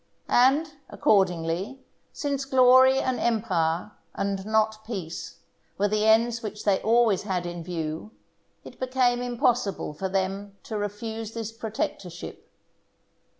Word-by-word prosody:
And, 290 +5 +3
accordingly, 190 +1 +1 0.3
since 280 -2 -2
glory 260 0 +6
and 260 -2 0
empire, 185 -6 0 0.2
and 195 -1 -2
not 220 0 +1
peace, 170 -7 -6 0.4
were 205 - +2
the 215 +1 +1
ends 230 +1 +3
which 210 -1 -6
they 200 -2 +3
always 225 -3 +3
had 185 -4 -2
in 175 -1 -5
view, 165 +1 -4 0.5
it - - -13
became 255 -1 +1
impossible 240 -8 0
for 190 +5 -4
them 195 +1 -2
to 220 - -6
refuse 220 +2 -5
this 225 -1 -4
protectorship. 215 -6 -5
215 Hz, 120 wpm, -26 LUFS, 190-240 Hz, 0.5 s, glory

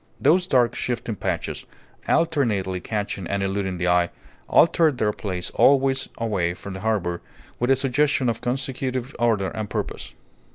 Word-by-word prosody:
Those 180 +2 +3
dark, 125 -6 +3
shifting 120 -2 -3
patches, - - -3 0.4
alternately 115 - +1
catching 100 -2 -3
and 100 0 -1
eluding 95 -1 -2
the 90 +1 -1
eye, 90 0 +3 0.4
altered 160 -4 +4
their 105 -2 +1
place 90 -4 -4
always 135 -1 +3
away 95 -7 -1
from 100 +1 -8
the 95 - -6
harbour, 95 -5 -1 0.4
with 120 - 0
a 135 - +6
suggestion 135 0 +1
of 115 -1 -1
consecutive 130 0 -3
order 110 -5 +2
and 105 +2 -5
purpose. - - -5
115 Hz, 150 wpm, -24 LUFS, 95-130 Hz, 0.4 s, a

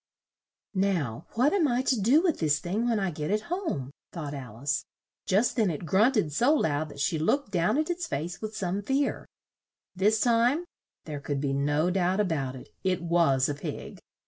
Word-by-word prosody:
"Now, 175 - -1
what 260 +7 +3
am 360 -7 +3
I 250 0 +1
to 255 -5 +1
do 270 - +4
with 345 -5 +1
this 150 -2 +2
thing 210 +9 -1
when 225 -3 +2
I 190 -2 -1
get 150 0 -4
it 210 +1 +1
home?" 160 - -3 0.2
thought 150 -4 -5
Al 130 -6 -7
ice. 135 0 -1 0.4
Just 205 +6 +2
then 220 -5 +2
it 160 0 -4
grunt 215 +9 +3
ed 160 -8 +1
so 245 - +3
loud 155 - 0
that 140 - -11
she 155 +3 0
looked 200 - +1
down 175 +7 +2
at 310 +3 0
its 350 -1 -3
face 170 - -4
with 215 0 -5
some 190 +1 -1
fear. 270 +6 -1 0.7
This 210 +4 +3
time 245 +8 +3 0.4
there 150 -2 -5
could 140 0 -3
be 140 -1 -1
no 145 +5 +1
doubt 185 +1 +1
a 210 - +3
bout 140 -7 -2
it 130 - -11
it 185 -2 0
was 165 -6 +3
a 145 - -1
pig! 145 - -7
185 Hz, 200 wpm, -28 LUFS, 150-235 Hz, 0.7 s, do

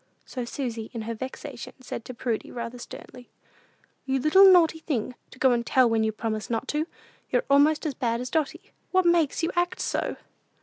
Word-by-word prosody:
So 250 -2 -5
Susy, 235 -3 -4
in 225 - -3
her 230 +1 -3
vexation, 260 +2 -7
said 250 -2 -7
to 255 - -7
Prudy, 230 -2 -2
rather 235 0 -6
sternly, 245 +1 -11 0.8
"You 265 0 +1
little 380 +8 +7
naughty 330 -3 +5
thing, 255 -7 -2 0.2
to - - -15
go 260 0 +4
and 240 -1 +1
tell 255 +1 +4
when 225 -1 +2
you 220 - +1
promised 215 0 -4
not 235 +3 -2
to! 305 +2 0 0.4
You're - - +1
almost 300 +3 +4
as 300 - -1
bad 235 -3 -1
as 250 0 -5
Dotty. 325 +5 -2 0.2
What 370 -1 +2
makes 340 -2 +2
you 330 - +1
act 350 0 0
so?" - - -1
260 Hz, 190 wpm, -26 LUFS, 235-315 Hz, 0.8 s, little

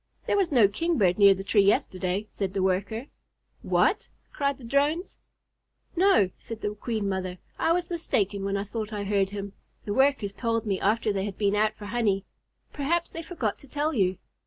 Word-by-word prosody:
"There - - +1
was 390 -5 +1
no 235 -7 +6
Kingbird 210 - +1
near 200 -1 +8
the 195 - -6
tree 205 +1 +3
yesterday," 190 0 +1
said 195 -1 -3
the 190 - +1
Worker. 200 +6 -1 0.6
"What!" - - +1 0.2
cried 280 -1 0
the 265 - -15
Drones. 285 +8 0 0.8
"No," 340 - +4
said 225 -1 -8
the 210 - -2
Queen 215 -1 -3
Mother, 185 -1 -3 0.2
"I 325 - +2
was 350 0 -1
mistaken 205 - -1
when 200 0 -1
I 200 - -2
thought 215 +1 -5
I 205 -1 -3
heard 200 -1 +1
him. 200 -1 -6 0.3
The 205 - -2
Workers 265 -6 +2
told 230 0 -1
me 195 -3 -1
after 215 +1 +1
they 195 0 -1
had 200 -2 -5
been 200 -1 +1
out 215 +1 +2
for 210 - -10
honey. 205 -3 0 0.5
Perhaps 330 +4 -1
they 330 - -5
forgot 300 - -3
to 280 - -16
tell 295 +3 -1
you." 190 -6 +1
210 Hz, 190 wpm, -27 LUFS, 195-275 Hz, 0.8 s, near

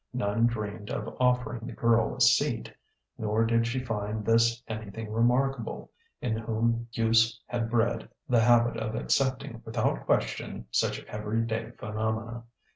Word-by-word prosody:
None 115 -1 +2
dreamed 105 -2 -4
of - - -4
offering 125 -2 +1
the - - -6
girl 115 -1 +2
a 130 - -6
seat; 120 0 +3 0.5
nor 110 +1 +1
did 115 0 +2
she 130 +2 -2
find 105 -2 -3
this 115 +1 +3
anything 110 0 -6
remarkable, 120 +2 0 0.3
in 110 -3 0
whom 115 +1 0
use 115 0 +3
had 115 -2 -2
bred 115 0 0 0.2
the 120 -4 +4
habit 120 0 +4
of 110 0 -3
accepting 130 -1 0
without 110 - -1
question - - -1
such - - 0
everyday 110 +1 -2
phenomena. 110 +2 -3
115 Hz, 135 wpm, -28 LUFS, 110-120 Hz, 0.5 s, the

